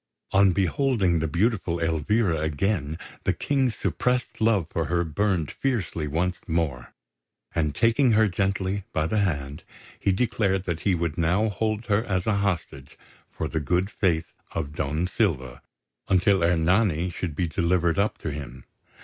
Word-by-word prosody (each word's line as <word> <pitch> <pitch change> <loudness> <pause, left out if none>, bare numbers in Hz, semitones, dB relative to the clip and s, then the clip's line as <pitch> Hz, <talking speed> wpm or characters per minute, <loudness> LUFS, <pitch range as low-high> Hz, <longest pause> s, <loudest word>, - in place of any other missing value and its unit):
On 95 0 +5
beholding 95 - +1
the 80 - 0
beautiful 90 0 0
Elvira 80 +3 +1
again 80 0 -1 0.3
the - - +2
King's 135 -5 0
suppressed 125 +2 -1
love 110 -6 +3
for 80 - -1
her 85 +4 +1
burned 85 0 0
fiercely 95 - -2
once 85 +5 -1
more; 75 -8 -2 0.6
and, 75 -3 0
taking 115 - +3
her 110 0 +5
gently 95 +1 -1
by 75 - +1
the 105 +7 0
hand, 75 -7 -1 0.4
he 100 - +2
declared 100 -3 +1
that 85 -4 -3
he 95 0 +1
would 85 -1 -2
now 90 +7 +2
hold 110 +2 -2
her 105 0 +2
as 95 -5 -1
a 110 -2 +1
hostage 85 -9 -3 0.3
for - - -3
the 80 - -2
good 90 +7 0
faith 85 -7 0 0.2
of 75 -3 -3
Don 75 +3 -1
Silva, 70 - -1 0.5
until 95 0 +3
Ernani 90 +1 +2
should 85 -4 -4
be 85 +3 0
delivered 85 +1 +1
up 105 +2 +1
to 75 - -4
him. 65 -4 -8
90 Hz, 155 wpm, -25 LUFS, 80-100 Hz, 0.6 s, On